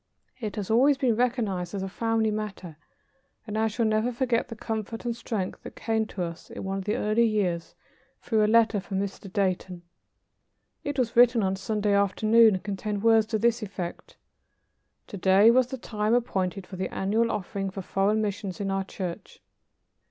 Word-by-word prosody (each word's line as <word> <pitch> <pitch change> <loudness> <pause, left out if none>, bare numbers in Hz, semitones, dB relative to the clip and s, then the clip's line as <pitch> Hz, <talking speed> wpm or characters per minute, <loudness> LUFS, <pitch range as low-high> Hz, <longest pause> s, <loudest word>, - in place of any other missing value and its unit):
It 215 -4 -4
has 205 -1 -3
always 270 +5 +5
been 255 -4 +2
recognized 215 -7 -1
as 195 - -3
a - - -3
family 225 +2 0
matter, 205 -6 -5 0.7
and 215 - -6
I 220 +1 +2
shall 225 +2 -1
never 215 +3 +1
forget 240 -1 0
the 230 - -8
comfort 220 +1 -5
and 235 -1 -1
strength 220 -5 -4
that - - -10
came 220 -1 -1
to 185 - -4
us 170 0 -7
in - - -7
one 195 0 -2
of 190 - -7
the 210 - 0
early 215 +2 +2
years 180 -6 -1 0.4
through 220 -2 +1
a 210 - +3
letter 230 -2 +4
from 190 0 -4
Mr. 195 -1 -5
Dayton. 185 -2 -1 1.0
It 285 -1 -3
was 240 -3 0
written 240 -2 +5
on 190 0 +1
Sunday 205 +1 -1
afternoon, 215 +2 +4
and 185 - -5
contained 205 0 -3
words 225 -1 +5
to 220 -1 0
this 235 +2 +1
effect: 185 -4 -6 0.9
"To 200 - -8
day 195 +4 +6
was 255 0 +4
the 265 - -5
time 215 -1 0
appointed 195 -5 -1
for 185 - -9
the 185 - -3
annual 220 +4 +1
offering 195 -2 -3
for 195 0 -7
foreign 205 +4 +1
missions 200 -1 -4
in 195 -1 -2
our 195 0 0
church. 185 -2 -7
210 Hz, 185 wpm, -27 LUFS, 195-230 Hz, 1.0 s, day